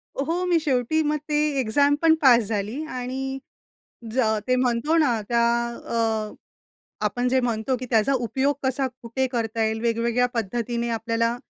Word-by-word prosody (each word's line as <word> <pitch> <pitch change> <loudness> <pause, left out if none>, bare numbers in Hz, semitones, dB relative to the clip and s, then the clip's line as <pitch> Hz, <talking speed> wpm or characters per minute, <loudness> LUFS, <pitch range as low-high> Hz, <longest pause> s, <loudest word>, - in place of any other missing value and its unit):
हो, 330 +6 -1
मी 345 -2 +3
शेवटी 285 +1 +1
मग 300 - +1
ते 295 - +1 0.2
एक्झाम 285 +5 +3
पण 325 -1 +5
पास 240 -4 +6
झाली 215 +7 -3
आणि 250 +1 -4 0.9
ज 260 - +2 0.3
ते 255 - +3
म्हणतो 255 +6 +1
ना 245 -8 +2
त्या 235 -1 +3 0.4
अ, 220 -2 -1 0.7
आपण 245 +4 0
जे 260 +1 +2
म्हणतो 240 +1 -1
की 250 +1 -6
त्याचा 230 +3 +3
उपयोग 265 +3 0
कसा, 265 +1 0 0.2
कुठे 240 +3 -1
करता 225 -2 -1
येईल, 220 0 -1
वेगवेगळ्या 235 +1 +1
पद्धतीने 235 +2 -2
आपल्याला, 230 +1 0
245 Hz, 150 wpm, -24 LUFS, 230-270 Hz, 0.9 s, पास